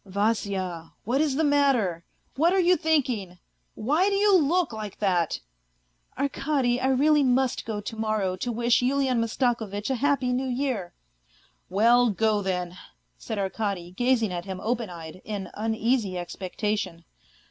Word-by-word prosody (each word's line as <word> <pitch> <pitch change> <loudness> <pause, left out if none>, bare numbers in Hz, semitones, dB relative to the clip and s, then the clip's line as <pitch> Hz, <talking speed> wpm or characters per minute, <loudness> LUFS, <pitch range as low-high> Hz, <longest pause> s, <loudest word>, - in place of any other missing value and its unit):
" - - -43
Vasya, 195 -4 -2
what 255 +6 +1
is 295 -4 +1
the 320 - +1
matter? 270 - +2 0.3
What 330 +6 +3
are 385 - +3
you 360 0 +5
thinking? 250 - 0 0.4
Why 305 - +2
do 400 - 0
you 405 0 +4
look 340 -2 +2
like 215 -2 -6
that? 180 -5 0 0.3
" - - -44
" - - -37
Arkady, 270 -2 0
I 260 - +1
really 290 +3 +4
must 260 -1 +1
go 215 -2 -2
to 225 - -6
morrow 215 -4 -1
to 240 +6 -3
wish 235 +1 +2
Yulian 260 -1 +1
Mastako 230 0 0
vitch 205 +5 -3
a - - +1
happy 275 -3 +2
New 260 +1 -1
Year." 245 -8 -2 0.4
" - - -32 0.3
Well, 235 +5 +4
go 215 0 +1
then! 180 -2 -2 0.2
" - - -46
said 220 - -5
Arkady, 195 -3 -2
gazing 230 -1 +1
at 175 0 -4
him 190 -1 -5
open 230 -2 -1
eyed, 170 0 -9
in 205 -3 -5
uneasy 220 -2 0
expectation. 185 0 -3
225 Hz, 170 wpm, -26 LUFS, 190-265 Hz, 0.4 s, you